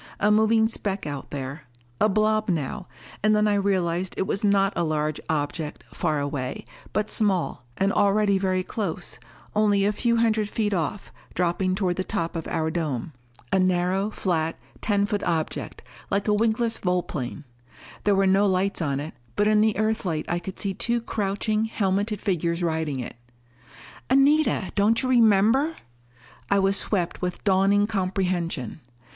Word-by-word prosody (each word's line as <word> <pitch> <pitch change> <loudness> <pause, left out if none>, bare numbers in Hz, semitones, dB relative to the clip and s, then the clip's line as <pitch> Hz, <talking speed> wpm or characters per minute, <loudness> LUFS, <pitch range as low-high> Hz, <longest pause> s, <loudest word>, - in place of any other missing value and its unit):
A 210 - +3
moving 220 +1 +4
speck 200 -5 -3
out 145 -2 -5
there. 140 0 -6 0.3
A 215 - +4
blob 215 +1 +1
now. 175 +3 -2 0.3
And 215 +1 +4
then 210 0 +3
I 210 - +3
realized 185 -3 0
it 190 - 0
was 195 - -2
not 200 -1 +3
a - - +1
large 155 -1 -1
object, 150 0 -2
far 155 -5 0
away, 140 -2 -3 0.3
but 215 0 -1
small, 190 - 0
and 195 +1 +1
already 200 -1 +3
very 185 -1 0
close 180 -4 -4 0.4
only 205 -2 +3
a 205 - +2
few 235 +2 +1
hundred 220 -2 +2
feet 210 -2 -1
off, 175 +3 -2 0.2
dropping 180 +1 +1
toward 185 -3 0
the 185 - 0
top 170 -5 -2
of 165 - -4
our 160 -1 -1
dome. 155 -4 -3 0.4
A 190 - +3
narrow, 185 +2 +1
flat, 165 -6 -1 0.2
ten 205 -2 +2
foot 205 0 -2
object, 160 -2 -3 0.3
like 200 +1 0
a 210 - +3
wingless 225 +2 +1
volplane. 170 -7 -2 0.6
There 205 -1 +3
were 195 0 +3
no 195 +2 +4
lights 190 0 0
on 140 -4 0
it, 150 +3 -6 0.2
but 205 - +2
in 215 0 +4
the 220 -1 +2
Earthlight 210 -7 -1
I 175 - 0
could 185 +2 -8
see 195 -1 -1
two 235 +5 0
crouching, 215 0 -1
helmeted 205 -1 -1
figures 175 -3 -1
riding 160 -4 -1
it. 120 - -6 0.9
"Anita! 275 -5 +3
Don't 215 +4 +3
you 255 - 0
remember!" 235 +6 +4 0.7
I 200 - +3
was 195 0 +3
swept 185 -4 0
with 180 -1 -3
dawning 200 +1 +3
comprehension. 185 - -2
195 Hz, 160 wpm, -25 LUFS, 170-210 Hz, 0.9 s, moving